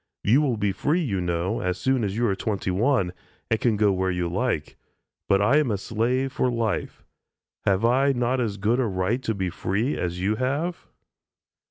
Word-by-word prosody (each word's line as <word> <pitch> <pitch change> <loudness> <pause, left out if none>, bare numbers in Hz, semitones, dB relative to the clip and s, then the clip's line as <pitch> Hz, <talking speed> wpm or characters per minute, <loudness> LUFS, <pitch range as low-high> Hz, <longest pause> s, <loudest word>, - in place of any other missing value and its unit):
You 125 +8 +4
will 130 -6 0
be 100 -1 +1
free, 150 - 0
you 100 - -1
know, 90 +5 -1
as 90 0 -1
soon 130 +1 +1
as 100 0 -2
you 120 - +2
are 100 -4 +1
twenty 100 -1 -2
one, 100 -2 +1 0.4
and 115 - +2
can 115 -4 +2
go 105 -1 +3
where 95 0 0
you 90 -1 -1
like, 90 - -2 0.5
but 100 0 +4
I 125 +8 +4
am 150 -4 +2
a 105 - 0
slave 120 +6 -1
for 130 - +1
life. 115 -3 -2 0.6
Have 100 +2 +3
I 135 +4 +4
not 125 0 0
as 105 -4 -2
good 110 +5 +1
a 125 - +2
right 95 +5 -1
to 110 -4 -2
be 95 -2 -2
free 105 - -1
as 90 0 -3
you 100 +4 0
have?" 145 +8 -2
110 Hz, 200 wpm, -25 LUFS, 95-125 Hz, 0.6 s, You